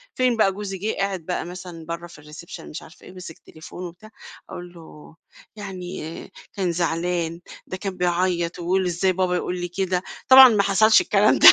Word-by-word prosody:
فين 255 Hz, -2 st, +2 dB
بقى 205 Hz, -3 st, +4 dB
جوزي 195 Hz, 0 st, -6 dB
جِه 210 Hz, +4 st, -3 dB
قاعد 195 Hz, -2 st, -1 dB
بقى 180 Hz, -, -3 dB
مثلًا 175 Hz, -2 st, -9 dB
برّه 170 Hz, +1 st, -6 dB
في 170 Hz, -, -15 dB
الريسيبشن 150 Hz, +3 st, -11 dB
مش 150 Hz, -, -7 dB
عارفة 160 Hz, -, -16 dB
إيه، -, -, -12 dB
مِسِك 180 Hz, -3 st, -10 dB
تليفونه 170 Hz, +3 st, -10 dB
وبتاع، 175 Hz, +6 st, -14 dB, 0.4 s
أقول 175 Hz, 0 st, -9 dB
له، 160 Hz, -2 st, -14 dB, 0.4 s
يعني 185 Hz, -4 st, -7 dB, 0.2 s
كان 190 Hz, -4 st, -1 dB
زعلان، 170 Hz, 0 st, -2 dB, 0.3 s
ده 185 Hz, -, -5 dB
كان 190 Hz, 0 st, -5 dB
بيعيّط 175 Hz, -1 st, 0 dB
ويقول 185 Hz, +2 st, 0 dB
إزاي 180 Hz, +2 st, +1 dB
بابا 185 Hz, 0 st, 0 dB
يقول 180 Hz, 0 st, -3 dB
لي 175 Hz, -, -2 dB
كده، 180 Hz, 0 st, -1 dB, 0.3 s
طبعًا 260 Hz, 0 st, +10 dB
ما 210 Hz, -3 st, +2 dB
حصلش 215 Hz, +2 st, +5 dB
الكلام 205 Hz, +1 st, +3 dB
ده، 335 Hz, -, +11 dB
180 Hz, 180 wpm, -23 LUFS, 170-195 Hz, 0.4 s, ده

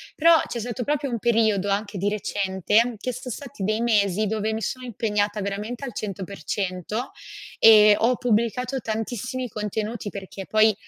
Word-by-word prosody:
però 330 Hz, +1 st, +6 dB
c'è 235 Hz, -, -4 dB
stato 240 Hz, +2 st, -4 dB
proprio 290 Hz, -2 st, -1 dB
un 230 Hz, -, -2 dB
periodo 220 Hz, -4 st, +2 dB
anche 205 Hz, 0 st, -1 dB
di 200 Hz, -, 0 dB
recente, 205 Hz, +3 st, +1 dB
che 250 Hz, +4 st, -4 dB
so' 255 Hz, +1 st, -7 dB
stati 245 Hz, -3 st, -7 dB
dei 215 Hz, +3 st, 0 dB
mesi 210 Hz, -3 st, +2 dB
dove 220 Hz, +1 st, -1 dB
mi 220 Hz, -, -3 dB
sono 255 Hz, +5 st, -4 dB
impegnata 210 Hz, -2 st, -1 dB
veramente 210 Hz, +6 st, -4 dB
al 245 Hz, -, -6 dB
100%, 195 Hz, -, -4 dB, 0.5 s
ehm, 210 Hz, -2 st, +8 dB
ho 245 Hz, +2 st, +3 dB
pubblicato 245 Hz, +3 st, 0 dB
tantissimi 235 Hz, +3 st, -3 dB
contenuti 210 Hz, +1 st, -4 dB
perché 195 Hz, -1 st, -8 dB
poi 215 Hz, 0 st, +4 dB
215 Hz, 155 wpm, -24 LUFS, 205-240 Hz, 0.5 s, ehm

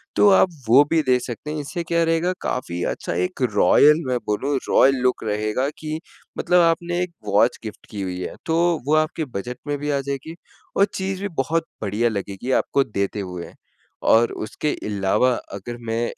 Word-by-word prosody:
तो 205 Hz, -, +6 dB
आप 190 Hz, -, +5 dB, 0.2 s
वो 130 Hz, +5 st, +7 dB
भी 165 Hz, -, +4 dB
दे 125 Hz, -, +5 dB
सकते 125 Hz, +5 st, -6 dB
हैं 150 Hz, -, -3 dB
इससे 170 Hz, +4 st, -4 dB
क्या 170 Hz, 0 st, +1 dB
रहेगा 165 Hz, +2 st, +1 dB
काफ़ी 90 Hz, -8 st, -3 dB
अच्छा -, -, -5 dB
एक 90 Hz, -, -4 dB
रॉयल 150 Hz, -, +5 dB
मैं 125 Hz, -1 st, +1 dB
बोलूँ, 135 Hz, +7 st, -1 dB
रॉयल 135 Hz, +1 st, +5 dB
लुक 125 Hz, -2 st, +1 dB
रहेगा 110 Hz, +5 st, -1 dB
कि 155 Hz, 0 st, -4 dB, 0.4 s
मतलब 180 Hz, 0 st, +3 dB
आपने 170 Hz, +1 st, +1 dB
एक 180 Hz, -1 st, -2 dB, 0.2 s
वॉच 115 Hz, +4 st, +3 dB
गिफ्ट 110 Hz, -, -8 dB
की 105 Hz, -, -5 dB
हुई 90 Hz, -1 st, -4 dB
है। -, -, -5 dB
तो 160 Hz, 0 st, +1 dB, 0.3 s
वो 155 Hz, -, +4 dB
आपके 155 Hz, +1 st, 0 dB
बजट 125 Hz, +5 st, -5 dB
में 145 Hz, -, -1 dB
भी 145 Hz, -, -3 dB
आ 140 Hz, -, +1 dB
जाएगी 140 Hz, +4 st, -5 dB, 0.4 s
और 200 Hz, -, +6 dB
चीज़ 190 Hz, 0 st, -3 dB
भी 205 Hz, -, -1 dB, 0.2 s
बहुत 165 Hz, +3 st, 0 dB, 0.2 s
बढ़िया 110 Hz, +3 st, +1 dB
लगेगी 100 Hz, +3 st, -4 dB
आपको 140 Hz, -, +1 dB
देते 100 Hz, -2 st, -3 dB
हुए 90 Hz, -3 st, -6 dB, 0.5 s
और 115 Hz, +1 st, +5 dB, 0.2 s
उसके 150 Hz, -, -2 dB
अलावा 100 Hz, +5 st, +2 dB, 0.2 s
अगर 110 Hz, +5 st, -6 dB
मैं 115 Hz, +1 st, 0 dB
135 Hz, 185 wpm, -22 LUFS, 105-160 Hz, 0.5 s, वो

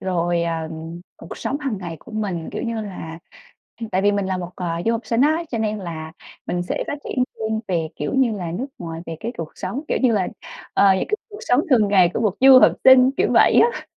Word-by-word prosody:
rồi, 175 Hz, -2 st, 0 dB
ờ, 165 Hz, -1 st, -2 dB, 0.5 s
cuộc -, -, -10 dB
sống 280 Hz, -, -3 dB
hàng 265 Hz, -8 st, -3 dB
ngày 175 Hz, -3 st, -6 dB
của -, -, -14 dB
mình, 195 Hz, -6 st, -3 dB
kiểu -, -, -4 dB
như 230 Hz, -2 st, -3 dB
là 180 Hz, -6 st, -7 dB, 0.7 s
tại 185 Hz, -, +1 dB
vì 205 Hz, 0 st, +3 dB
mình 200 Hz, -1 st, -1 dB
là 190 Hz, 0 st, -1 dB
một, 175 Hz, -1 st, -6 dB
à, 170 Hz, -2 st, -3 dB
du 230 Hz, -, +3 dB
học 230 Hz, -, -1 dB
sinh 230 Hz, 0 st, 0 dB
á 315 Hz, +4 st, +2 dB
cho 230 Hz, -, -2 dB
nên 215 Hz, -1 st, -1 dB
là 160 Hz, -4 st, -7 dB, 0.3 s
mình 175 Hz, -, -2 dB
sẽ 175 Hz, -, -3 dB
phát 290 Hz, -, -3 dB
triển 255 Hz, -, 0 dB, 0.2 s
riêng 220 Hz, 0 st, -1 dB
về, 165 Hz, -4 st, -1 dB
kiểu -, -, -3 dB
như 265 Hz, -4 st, +3 dB
là, 180 Hz, -5 st, -4 dB
nước 240 Hz, +10 st, -3 dB
ngoài, 165 Hz, -2 st, -6 dB
về 165 Hz, -, -5 dB
cái 235 Hz, -, -4 dB
cuộc 165 Hz, -2 st, -5 dB
sống, 200 Hz, +10 st, -4 dB
kiểu -, -, 0 dB
như 250 Hz, -3 st, +4 dB
là, 195 Hz, -4 st, +1 dB, 0.5 s
ờ, 195 Hz, -1 st, +5 dB
những 190 Hz, -, -2 dB
cái 425 Hz, -, 0 dB
cuộc 415 Hz, -, -9 dB
sống 255 Hz, -, +2 dB
thường 220 Hz, -6 st, +4 dB
ngày 185 Hz, -4 st, +4 dB
của -, -, -1 dB
một 210 Hz, -5 st, +1 dB
du 265 Hz, 0 st, +9 dB
học -, -, +6 dB
sinh, 260 Hz, 0 st, +8 dB
kiểu -, -, +2 dB
vậy -, -, +5 dB
á, -, -, -7 dB
200 Hz, 245 wpm, -21 LUFS, 175-240 Hz, 0.7 s, du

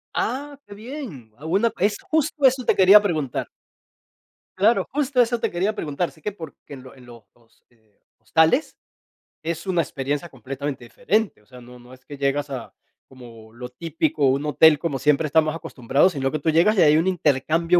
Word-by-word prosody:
Ah, 285 Hz, +2 st, -3 dB
qué 205 Hz, -, -11 dB
bien. 215 Hz, -, -9 dB
Alguna 195 Hz, +10 st, 0 dB
es 205 Hz, +3 st, +1 dB
justo 315 Hz, -5 st, -2 dB
eso 255 Hz, -2 st, +3 dB
te -, -, +2 dB
quería 195 Hz, +2 st, +7 dB
preguntar. 155 Hz, -, -2 dB, 1.1 s
Claro, 215 Hz, +5 st, +2 dB
justo, 275 Hz, -2 st, +1 dB
eso 240 Hz, 0 st, 0 dB
te -, -, -2 dB
quería 190 Hz, +5 st, -1 dB
preguntar, 160 Hz, -1 st, -3 dB
sí 155 Hz, -, -22 dB
que 210 Hz, -, -3 dB
porque 160 Hz, -5 st, -12 dB
en 130 Hz, -2 st, -10 dB
lo 130 Hz, -, -13 dB
en 125 Hz, -2 st, -16 dB
los, 120 Hz, -2 st, -14 dB, 0.5 s
eh, 110 Hz, -3 st, -34 dB, 0.2 s
hostales 160 Hz, -, +1 dB, 0.7 s
es 165 Hz, +1 st, -4 dB
una 175 Hz, -3 st, +1 dB
experiencia 145 Hz, +3 st, -4 dB
completamente 135 Hz, +1 st, -6 dB
diferente. 190 Hz, -, -2 dB
O -, -, -29 dB
sea, 125 Hz, +1 st, -14 dB
no 125 Hz, +1 st, -14 dB
no 125 Hz, +1 st, -16 dB
es 130 Hz, -, -18 dB
que 145 Hz, -2 st, -10 dB
llegas 140 Hz, +1 st, -1 dB
a 130 Hz, -4 st, -7 dB, 0.3 s
como 115 Hz, -4 st, -15 dB
lo 125 Hz, +1 st, -8 dB
típico, 160 Hz, +1 st, -2 dB
un 135 Hz, +3 st, 0 dB
hotel 150 Hz, 0 st, +5 dB
como 155 Hz, -5 st, -2 dB
siempre 150 Hz, +3 st, +1 dB
estamos 155 Hz, +1 st, +2 dB
acostumbrados, 160 Hz, +1 st, 0 dB
sino 135 Hz, -1 st, -2 dB
que 155 Hz, -, -3 dB
tú 160 Hz, -, -1 dB
llegas 170 Hz, +7 st, +3 dB
y -, -, +5 dB
hay 150 Hz, -1 st, +5 dB
un 165 Hz, -, +1 dB
intercambio 165 Hz, +1 st, +1 dB
155 Hz, 185 wpm, -22 LUFS, 135-195 Hz, 1.1 s, quería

